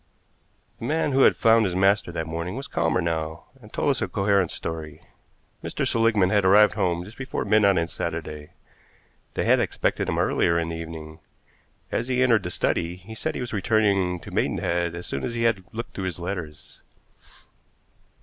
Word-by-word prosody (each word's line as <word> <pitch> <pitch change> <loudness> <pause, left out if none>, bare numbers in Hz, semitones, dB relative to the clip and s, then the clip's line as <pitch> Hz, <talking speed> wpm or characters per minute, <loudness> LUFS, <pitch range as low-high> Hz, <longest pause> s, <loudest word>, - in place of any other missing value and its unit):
The - - -5
man 155 -1 0
who 135 0 +3
had - - +6
found 115 -1 +5
his 95 -4 -1
master 95 0 +2
that 80 -1 -3
morning 85 +4 -4
was 135 +2 -5
calmer 85 +2 0
now, 80 -1 -3 0.2
and - - -15
told - - +1
us - - -2
a - - 0
coherent 100 -3 +1
story. 80 -2 -6 0.6
Mr. - - -2
Seligmann 110 -5 +3
had 105 -2 +3
arrived 105 +3 +6
home 90 -4 0
just 105 +7 -13
before 135 - -3
midnight 100 -2 +4
on 85 0 +1
Saturday. 80 -3 -5 0.9
They - - 0
had - - +4
expected - - -1
him - - -1
earlier 85 - +2
in 85 0 -1
the 85 - -4
evening. 80 -1 -8 0.7
As 120 - -1
he 130 0 +2
entered 115 -4 +4
the 90 - -4
study, 85 -1 -1
he 95 +5 -11
said 110 - -3
he - - -3
was 120 -2 -5
returning 100 -4 +1
to - - -10
Maidenhead 85 0 0
as 85 - -7
soon 70 - -4
as 115 - -3
he 115 - -1
had 110 -5 +1
looked 115 +1 -6
through 95 - -4
his 90 -3 -3
letters. 85 -4 -6
95 Hz, 190 wpm, -25 LUFS, 85-110 Hz, 0.9 s, had